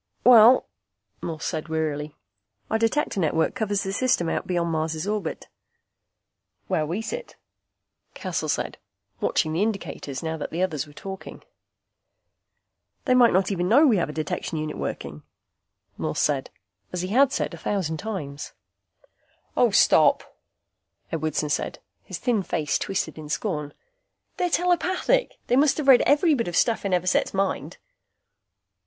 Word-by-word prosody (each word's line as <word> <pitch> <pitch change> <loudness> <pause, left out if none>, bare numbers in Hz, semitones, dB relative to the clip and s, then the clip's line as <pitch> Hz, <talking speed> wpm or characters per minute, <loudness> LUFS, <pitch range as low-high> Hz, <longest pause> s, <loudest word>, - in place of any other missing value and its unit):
"Well," 245 +1 +7 0.6
Morse 165 -2 -5
said 155 -1 -3
wearily, 155 -2 -2 0.6
"Our 220 - +2
Detector 230 -1 0
network 160 -1 +1
covers 205 -5 -1
the 195 -1 -3
system 240 -8 +1
out - - -2
beyond 170 -2 0
Mars' 160 0 -2
orbit." 205 -5 -3 1.2
"Where 155 - 0
we 185 +8 -3
sit," 485 - -6 0.8
Cassel - - -3
said, - - -2 0.4
watching 155 -1 0
the 165 - 0
indicators 195 - -3
now 160 0 -2
that 150 - -5
the 170 +3 -1
others 155 -5 -2
were 145 - -15
talking. 190 +4 -9 1.6
"They 255 - +3
might 245 -2 +6
not 190 +2 +2
even 180 -2 -1
know 280 +8 +6
we 235 -8 +4
have 165 - 0
a - - -3
detection 155 +1 -3
unit 155 0 -3
working," 75 0 -5 0.8
Morse 75 - -2
said, 140 -3 0 0.4
as 180 0 -3
he 185 - -3
had 265 +5 +4
said - - -2
a - - -7
thousand 175 -6 -2
times. 150 -9 -6 1.0
"Oh, - - +4
stop," - - +4 0.8
Edwardson 155 -1 -1
said, - - -2 0.3
his - - -6
thin 235 -5 0
face 160 -5 -1
twisted 195 -4 -3
in 150 -1 -9
scorn. 150 -4 -2 0.7
"They're 360 - 0
telepathic. 360 +8 +1
They 245 - +1
must 285 +2 +4
have 300 -3 -3
read 265 -2 +8
every 300 +3 +4
bit 235 -8 0
of 175 - -3
stuff 230 -3 +2
in 200 - -1
Everset's 180 +1 +1
mind." 195 0 -1
185 Hz, 150 wpm, -25 LUFS, 155-230 Hz, 1.6 s, read